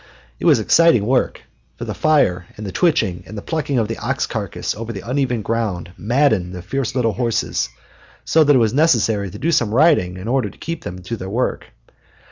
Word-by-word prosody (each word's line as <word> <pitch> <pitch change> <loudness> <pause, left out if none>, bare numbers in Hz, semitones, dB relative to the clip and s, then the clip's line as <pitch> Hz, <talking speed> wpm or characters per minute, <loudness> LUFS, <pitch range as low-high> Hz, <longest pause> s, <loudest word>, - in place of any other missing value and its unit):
It - - -4
was - - +6
exciting 165 -11 +4
work, 130 +2 0 0.3
for - - -5
the - - -4
fire 95 - +2
and 105 - -6
the 95 - -4
twitching 95 - +1
and 105 -2 -8
plucking 150 -4 -1
of 115 -3 +1
the 115 - -5
ox - - -1
carcass - - -4
over 115 +2 -6
the 100 0 -8
uneven 125 -3 0
ground 100 -6 -2
maddened 110 -6 +1
the 90 -1 -7
fierce 135 +3 -3
little 115 -4 +1
horses 120 -1 -1 0.6
so 160 - +4
that 145 -1 +4
it - - +6
was 115 -2 +2
necessary 115 - +2
to 100 - -9
do 160 +8 0
some 115 -9 +2
riding 120 - +3
in 95 +4 -7
order 130 +2 +1
to - - -17
keep 165 -1 -5
them 90 +1 -7
to 105 +6 -4
their 95 -1 -6
work. 120 +6 -2
115 Hz, 205 wpm, -20 LUFS, 100-140 Hz, 0.6 s, was